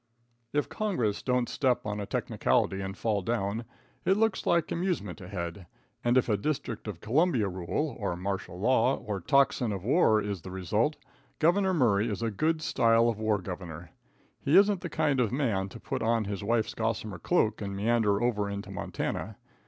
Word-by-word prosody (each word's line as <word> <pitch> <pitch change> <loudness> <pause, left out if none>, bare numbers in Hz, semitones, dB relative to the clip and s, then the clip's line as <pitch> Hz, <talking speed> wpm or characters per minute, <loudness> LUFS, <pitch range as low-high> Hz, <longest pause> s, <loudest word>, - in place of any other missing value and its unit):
If 145 0 0
congress 125 - -1
don't 125 -1 +1
step 130 -4 0
on 105 0 -3
a 100 - -4
technicality 95 0 0
and 95 0 -5
fall 105 -3 0
down, 110 +1 -2 0.4
it 190 - +3
looks 220 -2 +1
like 170 -2 +2
amusement 165 - -2
ahead, 90 -1 -6 0.4
and 120 +1 +3
if 130 - +3
a 105 -3 +2
District 120 -2 -3
of 95 -5 -6
Columbia 130 - +2
rule, 95 - -2
or 100 -5 -1
martial 95 -1 -4
law, 125 +4 +3
or 105 -4 -5
tocsin 130 0 +3
of 95 -3 -4
war 120 - +4
is 100 -4 -3
the 95 - -9
result, 105 - 0 0.4
Gov. 185 +3 +3
Murray 115 -6 +3
is 105 +2 -3
a 115 - 0
good 155 +9 0
style 115 -2 +3
of 110 -2 -3
war 110 -1 +2
governor. 90 -3 -7 0.5
He 150 +6 +4
isn't 200 -2 +5
the 170 - -4
kind 150 -5 +1
of 115 -4 +2
a - - -1
man 105 -9 0
to - - -10
put - - -4
on 115 -1 +1
his 100 0 -4
wife's 115 +1 +1
gossamer 110 -3 -2
cloak 115 -13 +1
and 100 -1 -4
meander 105 0 +2
over 105 -4 0
into 100 0 -5
Montana. - - -4
110 Hz, 185 wpm, -29 LUFS, 100-135 Hz, 0.5 s, isn't